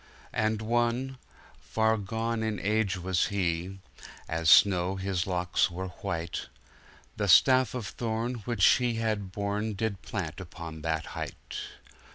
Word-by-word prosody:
And 110 0 0
one 120 +3 0 0.2
— - - -25
far 110 0 +4
gone 110 +2 -2
in 110 -1 -1
age 105 -1 +1
was 90 0 +1
he 90 -2 -1 0.3
— - - -15
As 80 0 0
snow, 95 0 +6
his 95 -2 -2
locks 90 0 +1
were 95 +2 -5
white 85 -3 -3 0.3
— - - -26
The 100 - 0
staff 130 +8 +6
of 120 -4 -3
thorn 115 +3 -2
which 115 -6 +2
he 125 -2 +4
had 110 -4 -1
borne, 105 +2 -2
Did 100 -1 -2
plant 95 -9 -4
upon 85 -3 -8
that 80 0 -1
height. - - -6
100 Hz, 150 wpm, -29 LUFS, 90-110 Hz, 0.3 s, snow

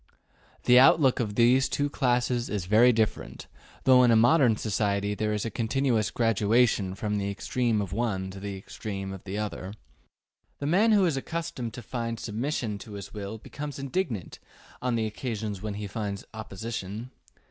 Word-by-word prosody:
The 125 0 +7
outlook 135 0 +5
of 105 -4 -2
these 125 +3 +4
two 145 - 0
classes 125 -3 0
is 100 -4 -2
very 110 +6 +6
different, 110 -2 -2 0.4
though 130 -1 +6
in 125 - +5
a 115 - +5
modern 120 +1 +5
society 100 -1 0
there 105 +1 -1
is 105 0 -1
a 115 - -3
continuous 115 -1 0
gradation 110 -3 +2
from 105 0 -2
the 100 0 -2
extreme 115 +2 0
of 95 - -6
the 100 - -4
one 95 -6 -1
to 95 - -9
the 100 0 -5
extreme 95 0 -6
of 95 - -9
the 100 +1 -4
other. 105 -2 -4 0.8
The 140 - -5
man 195 +9 +4
who 205 -3 +5
is 160 -6 +1
accustomed 135 -6 -4
to 125 - -8
find 115 -2 -4
submission 115 -2 -3
to 105 - -10
his 100 -1 -8
will 105 +1 -5
becomes 145 +6 -7
indignant 135 - -3 0.4
on 125 -1 0
the 115 -1 0
occasions 110 -3 -4
when 105 -1 -4
he 105 0 -5
finds 100 -1 -4
opposition. 110 +1 -6
110 Hz, 175 wpm, -27 LUFS, 100-125 Hz, 0.8 s, The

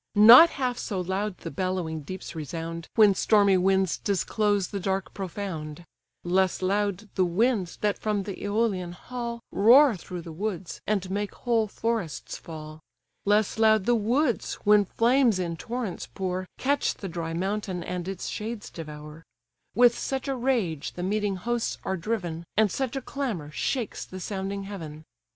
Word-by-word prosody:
Not 235 +10 +10
half 255 -5 -2
so 195 -4 -3
loud 190 +2 -2
the 165 - -7
bellowing 185 -4 -2
deeps 185 +6 -7
resound, 165 +1 -5
When 210 -3 +7
stormy 200 0 +4
winds 190 0 +2
disclose 205 0 0
the 200 - -4
dark 190 -1 -2
profound; 175 -4 -5 0.4
Less 185 +1 +1
loud 200 +1 0
the 190 - +2
winds 190 +1 +1
that 205 -1 0
from 210 -2 -1
the 200 -1 -5
Æolian 200 -4 -1
hall 235 +3 -6
Roar 245 +5 +6
through 180 -1 -7
the 165 - -8
woods, 185 0 -4
and 195 -3 0
make 205 +1 -2
whole 230 -3 +1
forests 220 -6 -3
fall; 155 -1 -9 0.5
Less 210 +2 +2
loud 220 -3 +4
the 240 - +3
woods, 240 +4 +1
when 210 0 +5
flames 235 +1 +3
in 170 -2 -2
torrents 230 +1 -4
pour, 185 -1 -3
Catch 285 +2 +1
the 195 - -6
dry 165 -2 -4
mountain, 190 0 -2
and 180 0 -4
its 195 -2 -4
shades 215 0 -5
devour; 150 0 -9 0.5
With 240 0 +6
such 270 0 -3
a 270 - 0
rage 235 - -1
the 180 - -5
meeting 205 +1 0
hosts 235 +5 -2
are 190 - -1
driven, 175 -4 -3
And 215 -3 +4
such 265 -1 -2
a 270 - -2
clamour 225 - -4
shakes 235 - -2
the 185 - -9
sounding 195 +1 -4
heaven. 160 -6 -8
195 Hz, 160 wpm, -27 LUFS, 180-220 Hz, 0.5 s, Not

